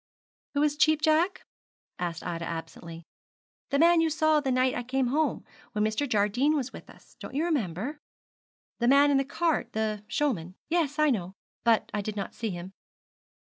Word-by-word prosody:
'Who 285 - +3
is 295 -1 +1
Cheap 310 0 +4
Jack?' 320 +5 +2 0.5
asked 170 -2 -4
Ida 170 -1 -3
absently. 165 0 -7 0.7
'The 280 - +1
man 335 +2 +5
you 325 - +2
saw 310 0 +3
the 280 -2 -2
night 255 0 +2
I - - -2
came 255 +1 0
home, 310 +4 0 0.3
when 210 -1 0
Mr. 220 +6 0
Jardine 235 +8 +2
was 265 -3 -2
with - - -11
us. - - -18
Don't - - -8
you 310 +4 +1
remember?' 255 - -2 0.8
'The 235 - +1
man 280 +2 +6
in 280 - +4
the 270 - +2
cart 320 +4 -1
the 215 -1 -2
showman? 200 - -1
Yes, 320 -3 0
I 305 -1 +4
know; 185 -6 -2 0.3
but 230 -1 +2
I 205 - 0
did 210 +1 -5
not 200 - -4
see 225 - -3
him.' 180 0 -7
255 Hz, 180 wpm, -28 LUFS, 205-300 Hz, 0.8 s, man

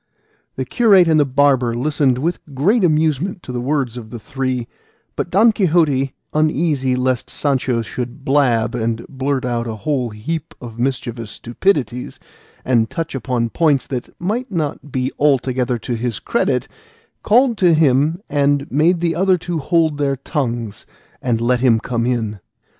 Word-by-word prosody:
The - - -3
curate 200 -8 +4
and 160 -1 +4
the 145 - +4
barber 130 -3 +2
listened 135 0 +1
with 165 +6 -1 0.2
great 195 - +2
amusement 160 +2 +1
to - - -7
the 125 -1 -3
words 130 -3 -1
of 110 -3 -8
the 120 - -7
three; 130 0 -3 0.5
but - - -3
Don 215 +6 +5
Quixote, 155 -9 +1 0.2
uneasy 150 -4 +1
lest 125 0 -1
Sancho 130 -4 0
should 125 +5 -6
blab 120 -5 +2
and 115 -1 -2
blurt 135 -1 -2
out 120 -1 -2
a 110 - -4
whole 125 +2 -1
heap 150 +10 -5
of 120 -2 -10
mischievous 120 -3 -2
stupidities, 125 - -2 0.5
and 115 -3 +2
touch 165 -2 -4
upon 120 -3 -2
points 150 -5 +2
that 125 -2 -5
might 225 +8 -2
not 150 -4 -3
be 130 0 -1
altogether 130 -3 +1
to 115 +2 -4
his 115 -2 -2
credit, - - 0 0.5
called 240 +2 +3
to 175 -3 +5
him 155 +4 +2
and 145 0 +1
made 165 +5 +2
the 170 -1 +1
other 185 +1 +3
two 170 -1 -3
hold 160 0 +1
their 140 -1 +1
tongues 120 -6 -4 0.3
and 115 -3 0
let 125 +1 +2
him 120 -3 +4
come 120 0 -2
in. 110 -4 -1
135 Hz, 160 wpm, -19 LUFS, 120-155 Hz, 0.5 s, Don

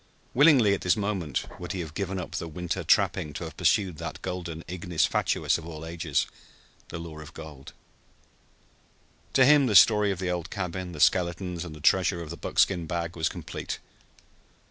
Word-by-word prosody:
Willingly 135 -7 +6
at 100 - -2
this 90 +4 +2
moment 100 -9 -2
would 90 +2 -5
he 95 - -4
have 80 -3 -7
given 95 +1 -3
up 90 - -5
the 85 - -4
winter 90 +2 -4
trapping 75 - +2
to - - -5
have - - -7
pursued 95 -6 +1
that - - -6
golden 85 -2 -5
ignis 85 -3 0
fatuus - - +1
of 80 - -10
all 80 -1 -7
ages 80 -3 -1 0.6
the 85 - -5
lure 80 -2 -8
of 75 0 -12
gold. 75 -4 -10 1.6
To 130 - +6
him 140 -1 +6
the 105 - 0
story 105 +2 +7
of 95 - -1
the 90 -1 -2
old 90 -2 -3
cabin, 90 -1 -4
the 75 - -8
skeletons 90 +1 +1
and 80 -3 -8
the - - -11
treasure 90 +1 +3
of 80 - -8
the - - -5
buckskin 85 -4 +1
bag 85 -1 -3
was 80 -1 0
complete. - - -6
90 Hz, 185 wpm, -27 LUFS, 80-95 Hz, 1.6 s, story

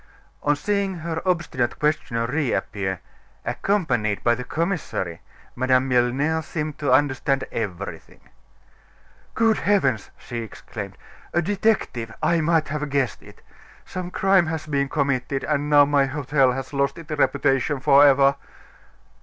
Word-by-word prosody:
On 145 0 +2
seeing 195 +4 -1
her 165 -1 -4
obstinate 165 -9 0
questioner 135 -6 0
reappear, 110 - -2 0.4
accompanied 120 - 0
by 120 - +4
the 125 +1 -4
commissary, 155 - -3 0.3
Madame 130 +1 +2
Milner 130 +6 +1
seemed 155 -1 -5
to 145 - 0
understand 135 0 +2
everything. 95 -6 -5 1.2
"Good 225 -1 +3
heavens!" 135 - +1
she 120 - -7
exclaimed, 115 -3 -8 0.4
"a 170 - +4
detective! 195 - 0
I 170 -1 +3
might 160 0 +2
have 150 0 -3
guessed 135 -4 -1
it! - - -16 0.4
Some 180 -1 -5
crime 190 -2 +3
has 160 -1 -3
been 140 -2 -1
committed; 140 -2 -1
and 150 -1 -1
now 145 -1 +7
my 140 -1 +2
hotel 135 -1 +1
has 135 +2 -6
lost 140 +1 0
its 165 -2 -10
reputation 140 -1 +1
forever!" 140 0 +5
140 Hz, 130 wpm, -23 LUFS, 130-160 Hz, 1.2 s, now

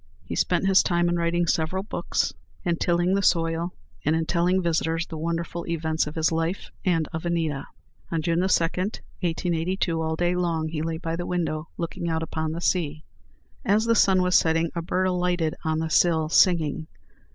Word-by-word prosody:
He - - -5
spent - - +1
his 195 -1 +6
time 175 -1 +1
in 175 - +1
writing 170 +1 +1
several 170 +4 0
books, 210 - -1 0.3
in 170 -3 0
tilling 175 +2 +1
the 200 - +2
soil, 165 -1 +1 0.3
and 155 - +2
in 160 0 0
telling 175 +3 +2
visitors 165 -1 0
the 165 - -8
wonderful 170 +1 -3
events 160 -2 0
of 150 - -7
his 160 0 +2
life 165 +3 -2
and 165 -4 +1
of 160 - -4
Anita. 165 -5 -1 0.4
On 165 - 0
June 165 +1 +1
2, - - +2
1882, 175 -1 -1
all 160 0 -1
day 175 +2 +1
long 165 -3 0
he 155 -1 -3
lay 160 0 -2
by 165 -1 -3
the 175 +1 -4
window, 165 -3 -2
looking 170 0 -3
out 160 0 -1
upon 160 0 -3
the 165 +2 -4
sea. 155 -4 0 0.6
As 210 +3 +2
the 230 - +3
sun 190 -4 +4
was 180 0 +1
setting, 165 0 +3
a 170 - -2
bird 180 +3 0
alighted 180 -3 0
on 160 0 0
the 160 0 -2
sill, 160 -2 +3
singing. 160 -3 +3
170 Hz, 185 wpm, -25 LUFS, 160-180 Hz, 0.6 s, his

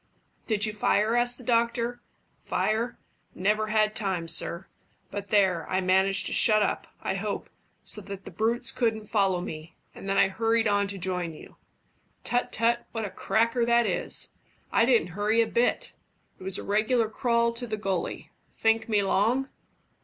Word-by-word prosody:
"Did 215 -2 +1
you 215 - -3
fire?" 210 +2 +2
asked 240 0 +2
the 250 - -12
doctor. 235 0 0 0.4
"Fire? 230 +3 -1 0.4
Never 210 +3 +1
had 215 0 +2
time, 190 -6 -1
sir. 170 +2 +1 0.5
But 200 0 -5
there, 190 -5 +2
I 185 - +1
managed 190 +2 +2
to - - -2
shut 215 -1 +5
up, - - -2 0.2
I - - -1
hope, - - -4 0.3
so 210 - -5
that 195 -1 -9
the - - -8
brutes 230 +2 0
couldn't 220 -3 -1
follow 195 -4 +1
me, 160 -1 -8 0.2
and 195 - -8
then 195 - +1
I - - +5
hurried 225 +3 +1
on 205 -1 +2
to 200 0 -6
join 180 -2 -3
you. - - -14 0.7
Tut, 245 0 -1
tut, 235 +1 +1
what 225 -2 -2
a 200 - -6
cracker 230 +2 +1
that 235 0 +3
is! - - -1 0.4
I 230 - +4
didn't 235 -9 +3
hurry 210 +5 +1
a 230 - +5
bit. 235 +2 0 0.5
It - - -11
was 190 0 0
a - - -5
regular 220 +3 +2
crawl 235 +1 +1
to 240 +1 -4
the 215 -1 -3
gully. 195 -3 -3 0.3
Think 225 0 +2
me 210 -2 +2
long?" 230 +8 +1
215 Hz, 175 wpm, -27 LUFS, 195-235 Hz, 0.7 s, shut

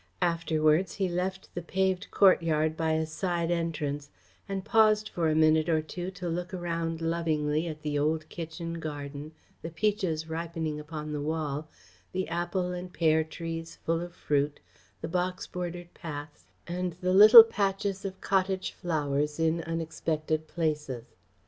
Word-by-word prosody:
Afterwards 165 0 +2
he 195 -2 0
left 185 +2 -3
the 175 - -4
paved 190 +2 0
courtyard 160 -5 +3
by 160 -1 0
a 160 0 +1
side 170 +1 -1
entrance 150 -4 -2 0.4
and 195 -1 -3
paused 215 -1 +4
for 165 -2 0
a 155 - +1
minute 155 +1 +4
or 160 -1 +2
two 175 +3 -5
to 180 - -4
look 175 +3 -3
around 165 -2 -2
lovingly 160 -1 0
at 155 -2 -7
the 145 -1 -1
old 155 +2 0
kitchen 165 0 -6
garden, 145 -1 -6 0.3
the 165 - -5
peaches 170 -3 -1
ripening 160 -1 -3
upon 150 0 -6
the 145 - -2
wall, 155 -1 -2 0.4
the 185 0 -1
apple 175 +2 -1
and 180 0 -6
pear 160 -1 +3
trees 165 +1 -6
full 165 0 -1
of 175 0 -7
fruit, 145 0 0 0.4
the 160 - -3
box 180 +2 -1
bordered 175 -1 -6
paths, 145 - -8 0.2
and 180 0 -3
the 185 0 +1
little 215 +4 +12
patches 200 -2 -1
of 190 -1 -5
cottage 190 -1 0
flowers 150 -2 -1
in 165 +1 +2
unexpected 160 -1 -2
places. 150 -8 -3
165 Hz, 150 wpm, -29 LUFS, 155-180 Hz, 0.4 s, little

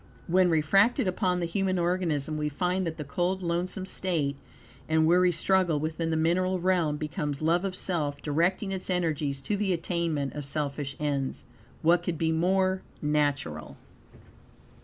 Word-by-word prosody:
When 180 +1 +3
refracted 195 +8 +3
upon 180 -1 0
the - - 0
human 190 +2 0
organism, 170 -4 0
we 150 0 -1
find 180 +4 -1
that 160 - -4
the 150 - -4
cold, 175 +6 -1
lonesome 180 +3 -2
state, 165 -7 -1 0.5
and 160 0 +3
weary 180 +2 +4
struggle 175 -1 +2
within 160 +2 -2
the 160 - 0
mineral 185 +4 +1
realm, 175 -4 +1
becomes 150 -2 -3
love 165 +3 +2
of 190 -2 -2
self, 150 -7 -2
directing 170 +7 0
its 190 0 -4
energies 155 -6 -1
to 205 - -1
the 200 -2 0
attainment 165 -4 -1
of 150 - -5
selfish 140 -1 -2
ends. 140 -3 -2 0.4
What 170 +2 +4
could 175 -2 -3
be 160 0 +1
more 185 +3 +2 0.2
natural? 140 - -1
170 Hz, 155 wpm, -28 LUFS, 150-185 Hz, 0.5 s, weary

